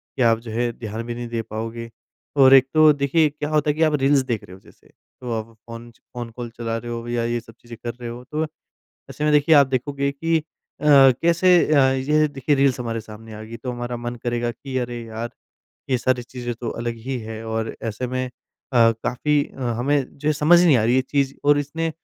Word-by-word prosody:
कि - - -3
आप 115 -2 +4
जो 115 -1 -9
है 120 +2 0
ध्यान 110 0 -6
भी 120 - -4
नहीं 120 0 -5
दे 115 -1 -3
पाओगे, 115 +1 -6 0.5
और 135 -1 +7
एक 135 -1 +7
तो 155 -1 +7
देखिए 145 +2 +2
क्या 150 0 -5
होता 150 -1 +1
है 150 - +3
कि 160 - -3
आप 155 -1 +3
रील्स 140 +1 +4
देख 115 -4 -2
रहे 90 - -13
हो 95 - -13
जैसे - - -22 0.3
तो 125 -1 -5
आप 110 +1 -9 0.2
फ़ोन 115 0 -9
च - - -29
फ़ोन 120 -2 -6
कॉल 120 -1 -6
चला 115 -1 -2
रहे 120 +1 -6
हो 115 0 -5
या 120 -1 -1
ये 120 0 -1
सब 115 0 -15
चीज़ें 120 -1 -11
कर 120 -1 -3
रहे 120 0 -8
हो 120 +1 -8
तो, 150 +4 -3 0.7
ऐसे 150 - -5
में 150 - +3
देखिए 150 +2 +5
आप 140 -2 +6
देखोगे 140 +2 -1
कि 165 +3 0
अ, - - -9 0.4
कैसे 150 +6 +5 0.2
अ, 145 - +5
ये 150 +4 +2
देखिए 145 0 0
रील्स 135 -2 +2
हमारे 115 -2 -3
सामने 110 +1 -12
आ 105 - -8
गई 115 +2 -9
तो 125 +2 -5
हमारा 120 0 -4
मन 120 0 -5
करेगा 120 0 -1
कि 130 +3 -6
अरे 120 -1 -3
यार, 115 +1 -5 0.6
ये 130 - +2
सारी 125 0 0
चीज़ें 120 -1 -6
तो 115 0 -5
अलग 115 0 -4
ही 135 -1 -1
है। 110 0 -7
और 110 0 -3
ऐसे 115 +3 -3
में 130 +1 -2
अ, - - -14 0.7
काफ़ी 145 +4 +1
अ, 135 - -8 0.2
हमें 140 +1 0
जो 150 +2 0
समझ 155 +4 +5
नहीं 155 -7 +5
आ 110 - +1
रही 120 +3 +3
ये 130 - +4
चीज़ 135 0 -1
और 145 0 +5
इसने 165 +3 -2
125 Hz, 235 wpm, -22 LUFS, 115-140 Hz, 0.7 s, और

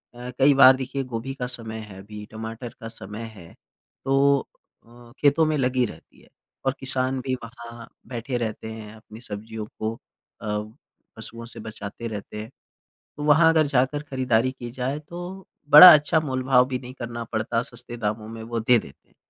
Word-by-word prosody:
अ, 125 +1 -7
कई 140 +2 +6
बार 135 -1 +8
देखिए 135 +1 -4
गोभी 125 +1 -5
का 125 -2 -4
समय 110 -3 -7
है 95 -1 -10
भी 105 +1 -9
टमाटर 115 +2 -7
का 115 - -6
समय 115 0 -8
है 85 -3 -13 0.5
तो 140 +1 +4 0.5
अ, 120 0 -16
खेतों 150 +2 +4
में 155 -1 0
लगी 125 -1 +1
रहती 80 -7 -12
है - - -22 0.4
और 135 - +2
किसान 130 0 +2
भी 130 -1 -2
वहाँ 115 0 -10 0.2
बैठे 125 +1 -4
रहते 110 -1 -4
हैं 110 -1 -9
अपनी 110 +1 -14
सब्जियों 110 0 -7
को 110 +1 -2 0.5
अ, 110 - -6 0.7
पशुओं 115 0 -7
से 115 0 -11
बचाते 110 +1 -7
रहते 105 -1 -7
हैं। 110 - -9 0.7
तो 150 - -5
वहाँ 160 +2 +6
अगर 160 -1 +4
जाकर 140 +2 +1
खरीदारी 130 -3 +1
की 120 -2 -8
जाए 130 +3 -3
तो 175 +4 -9 0.3
बड़ा 165 +5 +13
अच्छा 155 +2 +3
मोलभाव 130 -3 +2
भी 130 -1 -2
नहीं 125 0 -10
करना 120 -2 -6
पड़ता 115 +1 -1
सस्ते 120 0 -9
दामों 110 -1 -3
में 115 0 -8
वो 115 0 -3
दे 120 +2 +4
देते 70 - -14
हैं। - - -32
120 Hz, 180 wpm, -24 LUFS, 110-135 Hz, 0.7 s, बड़ा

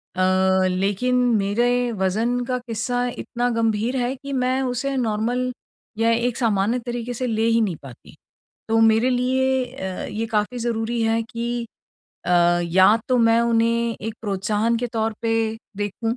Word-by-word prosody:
अ, 185 0 +2
लेकिन 195 +7 0 0.2
मेरे 240 +5 +1
वज़न 225 +6 +1
का 250 +1 -1
किस्सा 245 +2 -1
इतना 245 0 -2
गंभीर 225 +2 0
है 250 +1 -1
कि 280 +1 -7
मैं 255 0 +1
उसे 265 +2 -2
नॉर्मल 245 +2 -1 0.5
या 225 +1 +2
एक 235 +1 0
सामान्य 225 0 +1
तरीके 240 0 -4
से 255 +2 -3
ले 225 -1 0
ही 230 0 +3
नहीं 195 -6 0
पाती। 130 -4 -13 0.5
तो 225 0 +2
मेरे 225 +3 +4
लिए 260 +1 +1
अ, 190 -7 -5
ये 220 +2 -3
काफ़ी 220 +2 -1
ज़रूरी 230 0 -2
है 225 0 +1
कि 235 0 -4 0.6
अ, - - -1 0.3
या 185 +5 +5
तो 255 - +3
मैं 230 0 +4
उन्हें 230 0 +1
एक 220 +1 -5
प्रोत्साहन 210 +2 0
के 245 - -2
तौर 225 -1 0
पे 230 -1 +1 0.4
देखूँ 210 +3 -2
230 Hz, 155 wpm, -22 LUFS, 215-245 Hz, 0.6 s, या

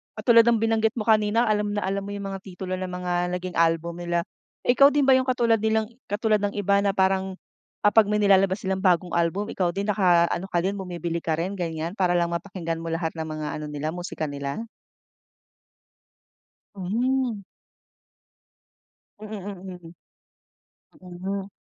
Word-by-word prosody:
katulad 230 -1 +5
ng 235 -1 +4
binanggit 225 +1 +1
mo 220 - -2
kanina, 215 +1 +3
alam 210 -2 0
na 205 - -1
alam 195 +1 -2
mo 200 - -6
yung 200 -1 -5
mga 195 - -5
titulo 185 -1 -8
ng 185 - -3
mga 180 0 -2
naging 180 0 -5
album 165 +1 +1
nila? 170 0 -1 0.4
Ikaw 265 +3 +6
din 290 - +4
ba 270 - +5
yung 260 0 +1
katulad 235 -3 +2
nilang 220 +1 0 0.2
katulad 210 +1 +1
ng 205 0 -2
iba 200 0 +2
na 200 -1 0
parang 190 0 +1 0.5
kapag 205 0 +5
may 210 - +2
nilalabas 195 -1 +3
silang 190 0 -1
bagong 180 -2 +2
album, 175 +6 0
ikaw 180 -2 0
din 200 +1 -2
nakaano 180 -1 +2
ka - - -1
din, 195 - 0
bumibili 170 -2 -3
ka 160 -1 0
rin 180 +4 -2
ganyan, 165 -2 -3
para 185 -4 +1
lang 170 0 0
mapakinggan 170 -2 -4
mo 165 - -6
lahat 165 0 -2
ng 160 -1 -5
mga 155 -1 -4
ano 155 - -5
nila, 150 +2 -3
musika 175 -3 -4
nila? 140 +8 -4 2.1
Hmm. 230 +3 -1 1.8
Mm, 215 - -9
mm, 185 -4 -8 1.1
mm. 190 +2 -5
190 Hz, 160 wpm, -25 LUFS, 175-210 Hz, 2.1 s, Ikaw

